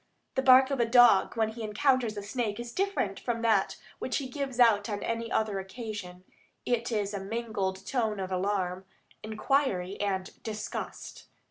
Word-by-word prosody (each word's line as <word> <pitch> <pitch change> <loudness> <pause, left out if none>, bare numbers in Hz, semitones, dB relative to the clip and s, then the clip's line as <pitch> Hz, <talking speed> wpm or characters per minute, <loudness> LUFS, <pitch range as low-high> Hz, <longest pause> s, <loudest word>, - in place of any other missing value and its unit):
The 265 - +1
bark 260 +1 +7
of 275 - -1
a 235 - +4
dog 240 -3 +5
when 220 -1 +2
he 225 +1 -8
encounters 230 0 +1
a 205 - -4
snake 220 0 -2
is 240 0 -6
different 390 - -1
from 230 -2 -3
that 215 -4 +2 0.2
which - - -1
he 275 - -3
gives 270 -2 -4
out 225 -3 +5
on 205 -1 -3
any 230 0 -3
other 215 -3 0
occasion; 190 -3 -7 0.4
it 240 0 0
is 210 -2 -1
a 200 - -2
mingled 195 -2 -3
note 220 -5 0
of 190 -1 -4
alarm, 185 -1 -1 0.4
inquiry, 215 -4 0
and 190 -2 -3
disgust. 215 -1 -6
220 Hz, 165 wpm, -29 LUFS, 200-240 Hz, 0.4 s, bark